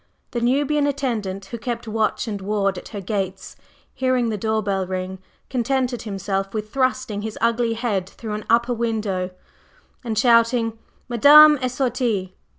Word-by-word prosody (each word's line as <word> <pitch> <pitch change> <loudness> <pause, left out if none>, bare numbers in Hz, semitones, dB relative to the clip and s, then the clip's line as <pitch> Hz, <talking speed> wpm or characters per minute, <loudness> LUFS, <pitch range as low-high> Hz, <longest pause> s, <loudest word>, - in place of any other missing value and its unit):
The 240 - -2
Nubian 285 +4 +2
attendant 225 -9 -2
who 230 +4 -7
kept 235 0 -4
watch 220 +2 -1
and 205 -3 -4
ward 195 -1 0
at - - -12
her 205 -3 -6
gates, 190 -1 -4 0.4
hearing 255 -2 +1
the 220 - -1
door 220 +1 -1
bell 195 -2 -1
ring, 185 0 -4 0.3
contented 255 0 -1
himself 195 -1 -3
with 215 0 -4
thrusting 255 -5 0
his 220 0 -5
ugly 230 0 +1
head 210 -6 -2
through 220 0 -7
an 210 - -3
open 230 - +5
upper 235 +1 -1
window 215 -6 -2 0.7
and 225 -3 -3
shouting 230 -1 +3 0.3
"_Madame 295 +4 +7
est 255 0 -2
sortie! 235 -8 -1
225 Hz, 155 wpm, -22 LUFS, 200-245 Hz, 0.7 s, Madame